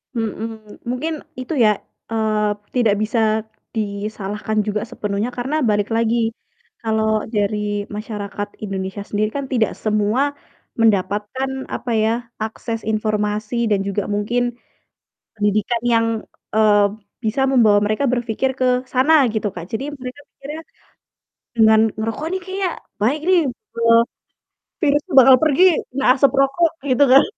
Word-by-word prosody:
Mhm. 220 -1 -5
Mungkin 300 +6 -2 0.3
itu 255 +5 -4
ya, - - +6 0.4
eee, 215 -1 +1 0.3
tidak 225 -4 +3
bisa 220 +2 0 0.6
disalahkan 210 0 -3
juga 210 0 -1
sepenuhnya 205 +3 -2
karena 265 +5 -2
balik, 205 -1 +1
lagi 230 0 +2 0.7
kalau 220 -1 0 0.3
dari 205 0 -1
masyarakat 205 -1 -5 0.2
Indonesia 195 +1 -4
sendiri 215 +1 0
kan 280 - -3
tidak 225 -3 +2
semua 215 +3 +1 0.6
mendapatkan, 210 +4 +1 0.3
apa 245 - -4
ya, 220 - +2 0.3
akses 225 +1 -4
informasi 215 +1 -1
dan 205 -2 +2
juga 200 0 -1
mungkin 210 +4 0 0.9
pendidikan 215 +2 0
yang, 230 0 +3 0.5
eee, 210 -1 +5 0.4
bisa 225 +5 0
membawa 215 -5 +5
mereka 215 +7 0
berfikir 240 +2 0
ke 255 - +2 0.3
sana 265 +5 +4 0.2
gitu, 215 -1 -1
Kak. 170 -1 -6
Jadi 230 +4 -2 0.2
mereka 255 +3 -7
pikirnya, 295 +4 -8 0.9
"Dengan 220 -1 +6 0.2
ngerokok 225 +7 -3
nih 375 - -1
kayaknya 380 0 -2 0.3
baik 265 +8 +2
nih, 365 -2 +6 0.4
eee, 230 0 +5 0.8
virus 295 -2 +2
tuh 305 - -5
bakal 260 0 +8
pergi, 310 +3 +3 0.3
kena 270 +1 -2
asap 275 -1 +4
rokok." 290 +5 +3 0.2
Gitu 260 +2 +5
kan. 270 - +8
220 Hz, 130 wpm, -20 LUFS, 210-255 Hz, 0.9 s, bakal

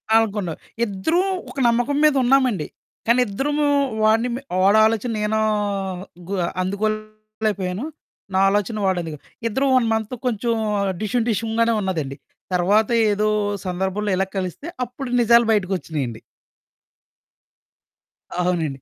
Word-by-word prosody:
అనుకున్నాం. 205 -7 +1 0.3
ఇద్దరూం 320 - 0 0.2
ఒక - - -14
నమ్మకం 245 +4 +1
మీదున్నామండి, 260 - +3 0.4
కానిద్దరమూ 255 +6 +2 0.4
వాడిని 225 +3 +3
మె 265 - -5 0.2
వాడాలోచన 220 +3 +4
నేనూ 215 +1 0 0.9
గు 200 - -2 0.3
అందుకోలేకపోయాను. 215 +1 -3 0.5
నా 190 - +3
ఆలోచన 205 +2 0
వాడందుగొ 170 -5 -1 0.3
ఇద్దరం 265 +5 +1
1 250 -3 +3
మంత్ 220 +1 -2
కొంచం 235 -1 0 0.5
డిషుం 220 +3 0
డిషుంగానే 225 +2 +1
ఉన్నదండి. 160 -8 -2 0.4
తర్వాత 200 +5 +3 0.2
ఏదో 210 +1 +1 0.4
సందర్భంలో 190 +3 -1
ఇలాగ 190 +1 -1
కలిస్తే, 185 - -4 0.2
అప్పుడు 250 +2 -7
నిజాలు 235 0 +5
బయటికొచ్చినియండి. 160 - -1 2.2
అవునండి. 160 -7 -1
215 Hz, 100 wpm, -22 LUFS, 190-235 Hz, 2.2 s, నిజాలు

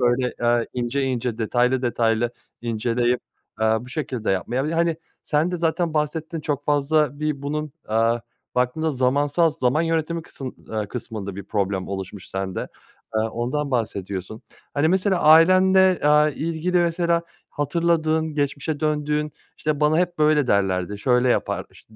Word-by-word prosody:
böyle, 125 +1 +1
ııı, 120 0 +2
ince 125 +3 -1
ince, 125 -3 -2
detaylı 125 +3 +1
detaylı 115 -1 +1 0.3
inceleyip, 120 +1 0 0.4
eee, 110 - +3
bu 125 - -11
şekilde 130 -5 -3
yapmaya 120 +8 -1
Bir 150 - -1
de, - - -2
hani, 165 -1 +1 0.3
sen 155 +3 +1
de 180 - -2
zaten 165 0 0
bahsettin. 155 +2 -2
Çok 145 -2 -2
fazla 145 0 +1
bir 150 -2 -2
bunun, 150 +1 -3 0.2
aaa, 115 +2 +2 0.4
baktığında 125 +6 +1
zamansal 145 +5 +2
zaman 145 +1 +1
yönetimi 165 0 -1
kısım 135 -4 -8
aaa, 110 -1 -2
kısmında 105 -5 -6
bir 100 - -6
problem 100 -2 -1
oluşmuş 95 0 -6
sende. 95 -1 -4 0.5
Eee, - - +3
ondan 125 +6 -2
bahsediyorsun. 105 -3 -3 0.3
Hani, 145 +2 +2
mesela 190 +1 +2
ailende, 185 +3 +6
aaa, 150 +1 +5
ilgili 165 +4 -1
mesela 170 0 +1 0.3
hatırladığın 160 +1 0
geçmişe 145 +1 -2
döndüğün, 150 -1 0 0.2
işte, 150 -1 -2
"Βana 150 +1 +3
hep 175 -1 0
böyle 150 -2 +4
derlerdi, 100 -2 +1
şöyle 125 +3 +2
yapar" 120 - 0
işte, 110 - -20
145 Hz, 150 wpm, -23 LUFS, 120-160 Hz, 0.5 s, ailende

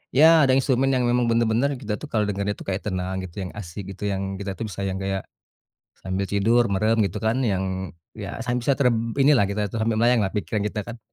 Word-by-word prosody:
Iya, 150 +4 +7 0.2
ada 130 -2 +4
instrumen 135 0 +2
yang 125 -1 +1
memang 120 0 +2
bener-bener 115 +3 +2
kita 105 -1 -3
tuh 150 - -6
kalau 105 -2 +1
dengernya 100 0 -1
tuh - - -10
kayak 95 0 -2
dia 105 - -3
tuh - - -5
kayak - - -1
tenang - - -3
gitu, 90 -2 -9
yang 90 - -6
asik 95 +1 -7
gitu, 100 - -10
yang 95 0 -2 0.2
kita 100 -1 -4
tuh 115 - -3
bisa 100 +1 -6
yang 95 - -3
kayak 95 -1 -1 0.8
sambil 95 +1 -2
tidur, 115 +4 +3
merem 110 +4 +2
gitu 95 - -4
kan 110 +3 +2 0.2
yang 95 0 0 0.5
iya 100 -2 -5 0.2
san 125 0 -1
bisa 140 - +2
terb 125 -4 +4 0.3
inilah 135 -5 +5
kita 105 +1 -2
tuh 115 - -4
sambil 115 -1 +1
melayang 120 0 +4
lah 95 - -1
pikiran 105 0 -1
kita 105 - -4
kan. 120 0 -7
110 Hz, 245 wpm, -24 LUFS, 100-120 Hz, 0.8 s, Iya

